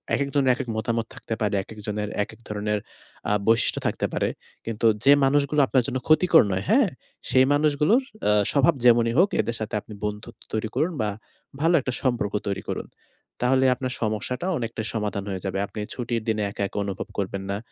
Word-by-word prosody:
একেকজনের 140 Hz, -1 st, +2 dB
একেক 130 Hz, -2 st, -5 dB
মতামত 115 Hz, +1 st, -1 dB
থাকতে -, -, -5 dB
পারে, 105 Hz, -1 st, +1 dB
একেকজনের 105 Hz, 0 st, -5 dB
একেক -, -, -12 dB
ধরণের 105 Hz, 0 st, -1 dB, 0.5 s
আ -, -, +3 dB
বৈশিষ্ট্য 115 Hz, 0 st, +3 dB
থাকতে -, -, -1 dB
পারে। -, -, 0 dB, 0.4 s
কিন্তু 115 Hz, 0 st, 0 dB, 0.2 s
যে 140 Hz, -, +8 dB
মানুষগুলো 145 Hz, +1 st, +3 dB
আপনার 130 Hz, -2 st, +2 dB
জন্য 130 Hz, -, -2 dB
ক্ষতিকর 160 Hz, +1 st, +6 dB
নয়, 95 Hz, 0 st, -1 dB
হ্যাঁ? 240 Hz, +2 st, +5 dB, 0.4 s
সেই 130 Hz, +1 st, +5 dB
মানুষগুলোর 150 Hz, -, +3 dB, 0.3 s
আ -, -, +5 dB, 0.2 s
স্বভাব 145 Hz, +4 st, +4 dB
যেমনই 115 Hz, -1 st, +5 dB
হোক 190 Hz, +3 st, +5 dB
এদের 115 Hz, -, -3 dB
সাথে 110 Hz, +1 st, -4 dB
আপনি 110 Hz, -, -12 dB
বন্ধুত্ব 105 Hz, +2 st, -6 dB
তৈরি 110 Hz, 0 st, -1 dB
করুন 155 Hz, +7 st, +1 dB
বা 105 Hz, -, 0 dB, 0.5 s
ভালো 165 Hz, +2 st, +3 dB
একটা 130 Hz, -, -3 dB
সম্পর্ক 120 Hz, -6 st, 0 dB
তৈরি 100 Hz, -1 st, -2 dB
করুন। -, -, -3 dB, 0.5 s
তাহলে 130 Hz, +2 st, +3 dB
আপনার 130 Hz, 0 st, -4 dB
সমস্যাটা 110 Hz, -, -2 dB
অনেকটাই 115 Hz, -2 st, -4 dB
সমাধান 105 Hz, -3 st, -2 dB
হয়ে 95 Hz, -2 st, -4 dB
যাবে। 95 Hz, 0 st, -2 dB
আপনি 105 Hz, -, -8 dB
ছুটির 120 Hz, -2 st, -2 dB
দিনে 110 Hz, -1 st, 0 dB
একা, 100 Hz, -, -3 dB
একা -, -, -9 dB
অনুভব 100 Hz, -1 st, -4 dB
করবেন 95 Hz, 0 st, -3 dB
না। 100 Hz, -, -1 dB
115 Hz, 180 wpm, -25 LUFS, 105-135 Hz, 0.5 s, যে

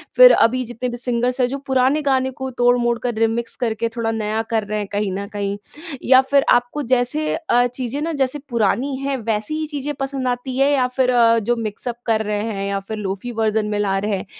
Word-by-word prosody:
फ़िर -, -, +9 dB
अभी 255 Hz, +3 st, +3 dB
जितने 240 Hz, +1 st, -4 dB
भी 240 Hz, -, -5 dB
सिंगर्स 245 Hz, +1 st, +1 dB
हैं, 245 Hz, -, +3 dB
जो 275 Hz, +2 st, -4 dB
पुराने 265 Hz, +3 st, +2 dB
गाने 265 Hz, -2 st, +1 dB
के 265 Hz, -, -2 dB
तोड़-मोड़ 245 Hz, -1 st, +3 dB
कर 245 Hz, -1 st, -1 dB
रिमिक्स 230 Hz, +1 st, 0 dB
करके 230 Hz, 0 st, -1 dB
थोड़ा 225 Hz, -1 st, -1 dB
नया 220 Hz, 0 st, -1 dB
कर 220 Hz, -1 st, +1 dB
रहे 215 Hz, -, -2 dB
हैं 205 Hz, -, -4 dB
कहीं 205 Hz, -1 st, -1 dB
न 200 Hz, +1 st, -4 dB
कहीं। 200 Hz, 0 st, -2 dB, 0.5 s
या 260 Hz, 0 st, +8 dB
फ़िर 280 Hz, -1 st, +4 dB
आपको 245 Hz, +5 st, -1 dB
जैसे 250 Hz, +5 st, +2 dB, 0.2 s
अ, 245 Hz, -7 st, +2 dB
चीज़ें 250 Hz, +3 st, -4 dB
ना 330 Hz, +2 st, -2 dB
जैसे 265 Hz, +3 st, 0 dB
पुरानी 240 Hz, +4 st, 0 dB
हैं, 275 Hz, 0 st, -2 dB
वैसी 220 Hz, +5 st, -2 dB
ही 315 Hz, -, -2 dB
चीज़ें 295 Hz, -1 st, -4 dB
पसंद 270 Hz, -1 st, -2 dB
आती 250 Hz, +1 st, -3 dB
है 275 Hz, +1 st, +3 dB
या 255 Hz, -3 st, +2 dB
फ़िर 255 Hz, -1 st, +3 dB
अ, 230 Hz, -1 st, +4 dB
जो 240 Hz, +3 st, 0 dB
मिक्सअप 230 Hz, +2 st, -4 dB
कर 220 Hz, -2 st, +1 dB
रहे 210 Hz, 0 st, -1 dB
हैं 195 Hz, 0 st, -3 dB
या 200 Hz, 0 st, -1 dB
फ़िर 215 Hz, +2 st, -7 dB
लोफ़ी 200 Hz, +4 st, -4 dB
वर्ज़न 215 Hz, -1 st, +1 dB
में 210 Hz, -1 st, -1 dB
ला 195 Hz, -2 st, +1 dB
रहे 205 Hz, +1 st, -1 dB
हैं, -, -, -7 dB
240 Hz, 225 wpm, -20 LUFS, 215-260 Hz, 0.5 s, फ़िर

